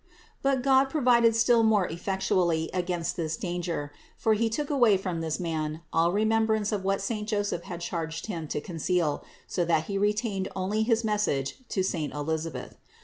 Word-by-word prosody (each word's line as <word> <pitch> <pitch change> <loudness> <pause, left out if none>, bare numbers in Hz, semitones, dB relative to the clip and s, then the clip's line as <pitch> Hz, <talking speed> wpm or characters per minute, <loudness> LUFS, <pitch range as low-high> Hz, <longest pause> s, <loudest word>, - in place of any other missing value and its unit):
But 270 -2 +1
God 265 0 +5
provided 240 -5 +4
still 230 0 +4
more 215 -4 +3
effectually 175 -2 0
against 175 -2 -1
this 160 -2 -2
danger; 175 -5 -3 0.3
for 220 - +2
He 225 +2 +1
took 290 +6 -2
away 240 -8 +5
from 185 -3 -3
this 160 -1 -2
man 160 -2 -2
all 165 +1 +3
remembrance 220 +1 +2
of 205 -3 -1
what 195 +1 0
saint 210 0 -3
Joseph 205 -5 -1
had 175 -1 -6
charged 165 -1 -4
him 165 -7 -4
to 150 - -2
conceal, 165 -1 -1 0.2
so 180 - -1
that 165 -2 +2
he 195 +3 -3
retained 205 -1 0
only 195 +3 0
his 225 +1 +2
message 210 -11 0
to 190 - 0
saint 160 -6 -2
Elisabeth. 160 +2 -4
190 Hz, 170 wpm, -28 LUFS, 165-220 Hz, 0.3 s, God